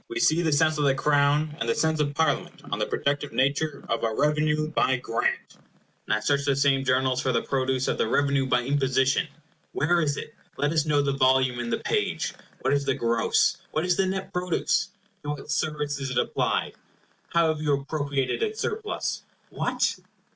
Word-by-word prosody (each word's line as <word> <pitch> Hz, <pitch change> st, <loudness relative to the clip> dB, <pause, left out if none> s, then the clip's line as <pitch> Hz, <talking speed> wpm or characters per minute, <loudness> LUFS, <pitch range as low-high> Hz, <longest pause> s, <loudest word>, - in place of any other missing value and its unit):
We 115 Hz, -, -4 dB
see 160 Hz, +7 st, +3 dB
the 160 Hz, -2 st, +1 dB
sense 155 Hz, +1 st, +2 dB
of 145 Hz, -, +2 dB
the 135 Hz, -1 st, +3 dB
Crown, 145 Hz, +2 st, +2 dB
and 115 Hz, -, -2 dB
the -, -, +2 dB
sense 160 Hz, -1 st, +1 dB
of 145 Hz, -1 st, 0 dB
Parliament, 160 Hz, +1 st, -1 dB
on -, -, -1 dB
the -, -, 0 dB
productive 145 Hz, +1 st, -1 dB
nature 140 Hz, +2 st, 0 dB
of 115 Hz, -, -1 dB
a 115 Hz, -, +1 dB
REVENUE 150 Hz, +3 st, +1 dB
BY 130 Hz, -4 st, +2 dB
GRANT. 115 Hz, -2 st, -2 dB, 0.5 s
Now 110 Hz, -, +1 dB
search 140 Hz, -1 st, +1 dB
the 140 Hz, -1 st, +1 dB
same 135 Hz, -1 st, +2 dB
Journals 130 Hz, 0 st, +1 dB
for 130 Hz, -, 0 dB
the 120 Hz, -, 0 dB
produce 130 Hz, -1 st, 0 dB
of -, -, -1 dB
the -, -, +2 dB
REVENUE 140 Hz, +2 st, +1 dB
BY 125 Hz, -1 st, +2 dB
IMPOSITION. 135 Hz, +3 st, +1 dB, 0.5 s
Where 170 Hz, +4 st, +2 dB
is 145 Hz, -2 st, 0 dB
it? 150 Hz, -, -7 dB, 0.2 s
Let 145 Hz, +1 st, +1 dB
us 160 Hz, -1 st, +1 dB
know 145 Hz, -1 st, +3 dB
the 140 Hz, -1 st, 0 dB
volume 130 Hz, -2 st, +3 dB
and 120 Hz, -1 st, -3 dB
the -, -, +1 dB
page. 430 Hz, -2 st, -1 dB, 0.3 s
What 135 Hz, -, +1 dB
is 140 Hz, 0 st, +1 dB
the -, -, +1 dB
gross, 115 Hz, -1 st, +2 dB
what 155 Hz, +2 st, -1 dB
is 180 Hz, -1 st, +2 dB
the 190 Hz, +1 st, +1 dB
net 190 Hz, 0 st, -4 dB
produce? 180 Hz, -1 st, 0 dB, 0.3 s
To 145 Hz, -, -6 dB
what 145 Hz, -1 st, -5 dB
service 150 Hz, -2 st, -1 dB
is 135 Hz, -1 st, -3 dB
it 125 Hz, -, -3 dB
applied? -, -, 0 dB, 0.6 s
How 170 Hz, -1 st, +3 dB
have 155 Hz, -1 st, -2 dB
you 150 Hz, -2 st, +2 dB
appropriated 140 Hz, -, -2 dB
its 435 Hz, -1 st, -2 dB
surplus? 430 Hz, -1 st, -3 dB, 0.3 s
What! -, -, 0 dB
145 Hz, 200 wpm, -26 LUFS, 130-155 Hz, 0.6 s, see